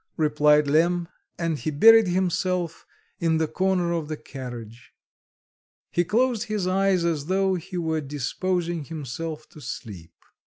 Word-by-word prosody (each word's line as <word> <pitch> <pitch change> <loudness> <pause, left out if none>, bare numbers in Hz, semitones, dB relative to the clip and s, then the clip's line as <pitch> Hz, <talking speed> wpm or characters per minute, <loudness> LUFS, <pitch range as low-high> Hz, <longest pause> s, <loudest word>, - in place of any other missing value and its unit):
replied 150 -1 +4
Lemm, 170 +4 +2 0.3
and 165 -3 -1
he - - -2
buried 225 +8 +7
himself 180 -1 -1 0.3
in 165 -1 +2
the 160 0 +1
corner 185 0 0
of 165 -3 -2
the 155 0 -4
carriage. 120 -5 -9 1.0
He 175 - +2
closed 235 +4 +1
his 215 -4 -2
eyes 185 -1 +2
as 155 -4 -1
though 190 +1 +2
he 185 +1 -5
were 160 -2 -1
disposing 165 +4 -2
himself 155 +1 -6
to 155 - -14
sleep. 90 - -8
165 Hz, 135 wpm, -25 LUFS, 150-185 Hz, 1.0 s, buried